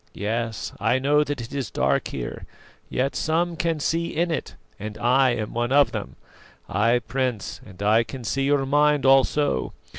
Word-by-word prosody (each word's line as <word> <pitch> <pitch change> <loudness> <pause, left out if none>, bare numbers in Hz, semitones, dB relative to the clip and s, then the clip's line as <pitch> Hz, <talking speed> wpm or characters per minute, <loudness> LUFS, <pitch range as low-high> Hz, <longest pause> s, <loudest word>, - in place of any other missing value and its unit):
Yes, 115 +2 -3
I 115 +5 +2
know 145 +3 +3
that 145 -3 -4
it 115 +4 -8
is 135 -5 -3
dark - - +1
here, 60 -3 -6 0.4
yet 135 +2 -1
some 170 +2 0
can 165 -1 -1
see 165 +3 -1
in 170 +2 +1
it, 160 - -4 0.2
and 105 +1 -6
I 130 +4 +3
am 110 -2 -4
one 120 +1 -1
of 145 +1 +5
them. - - -5 0.5
Ay, 115 +4 +2
Prince, 130 -5 -2
and 95 0 -9
I 110 +3 +4
can 130 +1 -8
see 135 +4 -1
your 140 -1 +2
mind 145 0 +3
also. 135 - +3
130 Hz, 175 wpm, -24 LUFS, 115-145 Hz, 0.5 s, of